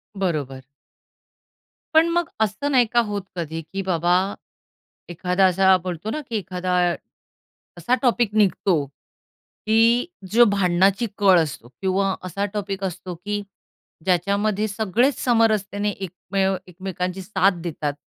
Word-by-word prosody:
बरोबर. 145 -9 -3 1.3
पण 325 +1 +6
मग 345 -1 0
असं 250 +8 -2
नाही 250 -3 +5
का 240 - +5
होत 205 -1 -2
कधी 165 -1 -4
की 195 - -2
बाबा 175 0 +2 1.0
एखादा 180 +2 +1
असा 190 +1 +4
बोलतो 180 +3 -4
ना 305 - -3
की 230 - -3
एखादा 185 -1 -3 1.0
असा 175 +9 +1
टॉपिक 240 -4 +2
निघतो 195 -2 +2 0.9
की 220 - +3 0.5
जो 240 +2 +6
भांडणाची 195 +4 +2
कळ 190 -3 +5
असतो 140 -5 -7
किंवा 190 +7 -1
असा 200 +3 -2
टॉपिक 200 -1 -4
असतो 180 -1 -5
की 205 +4 -4 0.6
ज्याच्यामध्ये 200 +4 +1
सगळेच 220 +6 +1
समरसतेने 215 -4 +2
एकमेव 190 +1 -2
एकमेकांची 185 +1 -4
साथ 190 -2 +1
देतात 150 -4 -3
195 Hz, 120 wpm, -22 LUFS, 180-210 Hz, 1.3 s, पण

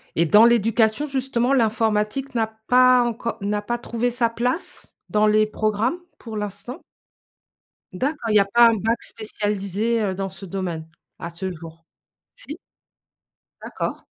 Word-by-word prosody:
Et 170 - +3
dans 210 +8 +6
l'éducation, 225 +3 +2
justement, 265 -2 0
l'informatique 225 +2 0
n'a 225 -1 +1 0.2
pas 255 0 +5
encore 235 0 -3
n'a 205 +1 -1
pas 240 +3 -3
trouvé 235 +1 -2
sa 235 -1 +2
place, 245 - -4
dans 215 0 +3
les 215 0 +4
programmes, 215 - -1 0.2
pour 220 -3 -8
l'instant? 210 +5 -5 1.1
D'accord, 265 +3 -3
il 215 - +1
y - - +7
a 200 - +3
pas 235 +4 +5
un 225 - +1
bac 225 +3 -1
spécialisé, 210 +1 -3
heu, 195 -3 -1
dans 195 0 -3
ce 195 - -11
domaine 175 -4 -5 0.3
à 170 - -6
ce 190 +2 -5
jour? 165 -1 -11 0.5
Si? 345 - -10 1.0
D'accord. - - -4
220 Hz, 150 wpm, -22 LUFS, 205-240 Hz, 1.1 s, y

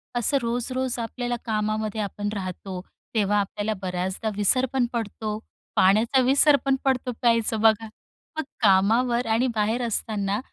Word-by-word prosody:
असं 240 +4 +2
रोज-रोज 245 +2 -2
आपल्याला 240 +1 -3
कामामध्ये 215 0 -1
आपण 205 +1 -3
राहतो, 185 -1 -5 0.4
तेव्हा 205 -1 +2
आपल्याला 205 +2 -2
बऱ्याचदा 185 +4 -2
विसर 210 +6 +3
पण 260 -2 +2
पडतो 215 -1 -3 0.4
पाण्याचा 220 +7 +4
विसर 280 +3 +5
पण 270 - +3
पडतो 255 -1 +1
प्यायचं 230 -2 +2
बघा. 225 0 +4 0.5
मग 315 - 0 0.2
कामावर 225 +5 +3
आणि 230 +3 +2
बाहेर 220 +3 +1
असताना 205 -2 -1
220 Hz, 130 wpm, -25 LUFS, 205-245 Hz, 0.5 s, विसर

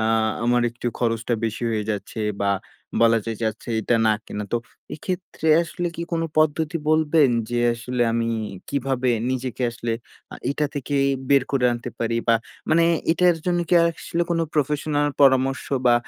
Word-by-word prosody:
আ - - 0 0.4
আমার 120 0 +3
একটু 120 +1 -7
খরচটা 115 0 0
বেশি 115 +1 -3
হয়ে 110 -2 0
যাচ্ছে 105 +2 -4 0.2
বা 100 - +2 0.5
বলা 115 0 +5
যায় 115 -1 -3
যাচ্ছে 110 +2 -3
এইটা 110 - +1
না 110 - +5
কেনা। 105 - -4
তো 120 - +3 0.4
এক্ষেত্রে 180 0 -4
আসলে 175 +1 -4
কি 170 - -3
কোনো 165 0 0
পদ্ধতি 155 +1 +2
বলবেন 155 -2 +4 0.2
যে 120 - 0 0.2
আসলে 120 +1 -2
আমি 115 0 0 0.4
কিভাবে 130 -2 0 0.2
নিজেকে 130 0 -3
আসলে 120 -1 -3 0.4
আ - - -6
এইটা 150 +1 0
থেকে 145 0 -4 0.2
ই - - +1 0.2
বের 140 -2 +5
করে 135 -3 +1
আনতে 120 0 -5
পারি? 115 0 -1
বা 115 - +6 0.4
মানে 165 +1 +5 0.3
এটার 175 0 +3
জন্য 175 -1 +2
কি - - +3
আসলে 170 +1 -2
কোনো 165 -1 +2
professional 145 0 +1
পরামর্শ 135 -1 +4 0.2
বা 120 - +6
130 Hz, 170 wpm, -23 LUFS, 115-155 Hz, 0.5 s, বা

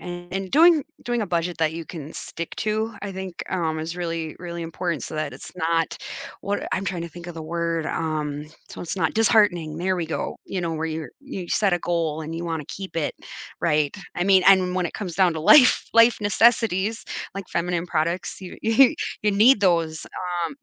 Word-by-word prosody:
And 180 +2 -5
doing 325 0 +6 0.2
doing 240 -1 0
a - - -2
budget 175 -1 -1
that 160 -1 +2
you 165 0 -6
can 155 -2 -8
stick 170 0 -7
to, 220 +1 -1
I 205 -1 -5
think, 185 -2 -6
um, 165 -4 -1
is 160 +2 -4
really, 165 -2 -3
really 170 -1 -5
important 165 -1 -3
so - - -7
that 155 -2 -2
it's - - -10
not 165 -1 0 0.4
what 200 +1 -2
I'm 190 - -1
trying 175 -2 -2
to 170 - -5
think 175 +2 -10
of 175 - -7
the 165 - -6
word, 165 0 -2
um- 150 -2 -2 0.2
so - - -9
it's 175 - -4
not 190 - +1
disheartening- 205 -8 +3
there 185 +2 +1
we 175 - -1
go. 160 - -3
You 190 - -3
know, 170 -2 -2
where 160 0 -2
you're 160 -1 -4
you 230 -11 -7
set 200 -3 +2
a 175 - +2
goal, 165 -3 -1
and 160 +1 -6
you 170 +1 -4
wanna 165 -3 -3
keep 190 -3 -7
it, 155 -3 -1 0.5
right? 150 +3 +1 0.2
I 175 - 0
mean, 195 -1 +5
and 185 -2 +5
when 180 -1 +1
it - - -9
comes 185 -5 -5
down 185 -2 +4
to 160 - -3
life 250 - +7
life 230 +1 +6
necessities, 215 -1 +2 0.3
like 195 -2 -6
feminine 175 0 -1
products, 170 +2 -1
you 185 -2 -9
you 245 +6 +5 0.3
you 210 - +3
need 215 +4 +5
those. 165 -4 +1 0.4
Um, 285 - -9
175 Hz, 205 wpm, -24 LUFS, 165-195 Hz, 0.5 s, life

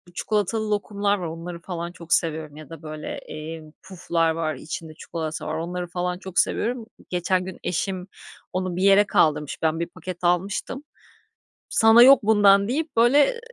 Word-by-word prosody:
çikolatalı 215 +1 -1
lokumlar 205 0 0
var 175 -3 -4
onları 170 +1 -7
falan 170 -1 -5
çok 170 -1 -3
seviyorum 155 -3 -1
ya 155 -2 -11
da, 165 -1 -10
böyle, 155 0 -7
emm, 155 0 -8
puflar 170 -3 -1
var, 160 -2 -2
içinde 155 +3 -7
çikolata 160 -1 -5
var. 155 - -3
Onları 175 +2 -4
falan 180 0 -3
çok 190 -1 -2
seviyorum. 235 0 0 0.2
Geçen 180 +1 0
gün 190 - -8
eşim 185 +1 -2 0.5
onu 185 -1 -2
bir 185 - -1
yere 200 +1 +6
kaldırmış, 150 -7 +1
ben 160 0 +1
1 170 - -2
paket 180 0 -8
almıştım. 195 - -1 0.9
"Sana 225 +2 +6
yok 270 0 +8
bundan." 205 -2 +5
deyip, 300 +2 -2
böyle, 245 +6 +6
ııı, 480 - -7
180 Hz, 165 wpm, -24 LUFS, 165-205 Hz, 0.9 s, yok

